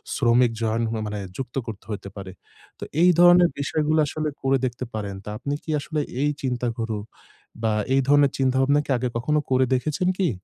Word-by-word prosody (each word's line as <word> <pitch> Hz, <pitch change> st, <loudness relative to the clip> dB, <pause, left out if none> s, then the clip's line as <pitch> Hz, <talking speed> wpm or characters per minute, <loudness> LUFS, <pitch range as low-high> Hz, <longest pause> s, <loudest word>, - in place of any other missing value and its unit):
শ্রমিক 120 Hz, -1 st, +3 dB
জয়েন 115 Hz, +1 st, 0 dB
হ 115 Hz, -, -3 dB
মানে 105 Hz, 0 st, -4 dB, 0.2 s
যুক্ত 130 Hz, -2 st, -6 dB
করতে 105 Hz, -2 st, -7 dB
হইতে 100 Hz, -1 st, -5 dB
পারে। 95 Hz, -1 st, -7 dB, 0.5 s
তো -, -, -6 dB, 0.2 s
এই 180 Hz, -, +7 dB
ধরনের 175 Hz, 0 st, +7 dB
বিষয়গুলো 155 Hz, +2 st, +1 dB
আসলে 155 Hz, +2 st, -2 dB
করে 135 Hz, 0 st, +2 dB
দেখতে 125 Hz, 0 st, -4 dB
পারেন। 100 Hz, -2 st, -4 dB
তো -, -, -8 dB
আপনি 140 Hz, -, -3 dB
কি -, -, -13 dB
আসলে 150 Hz, +1 st, -3 dB, 0.2 s
এই 145 Hz, -, +2 dB
চিন্তা 125 Hz, -2 st, -1 dB
গুলো 110 Hz, -2 st, -2 dB, 0.6 s
বা 110 Hz, -1 st, +2 dB, 0.2 s
এই 135 Hz, -, +4 dB
ধরনের 145 Hz, -1 st, +5 dB
চিন্তাভাবনা 135 Hz, +2 st, +2 dB
কি -, -, -19 dB
আগে 125 Hz, +1 st, -1 dB
কখনো 150 Hz, +6 st, +1 dB
করে 130 Hz, 0 st, +4 dB
দেখেছেন 150 Hz, +8 st, 0 dB
কি? 185 Hz, -5 st, +2 dB
130 Hz, 190 wpm, -24 LUFS, 115-150 Hz, 0.6 s, এই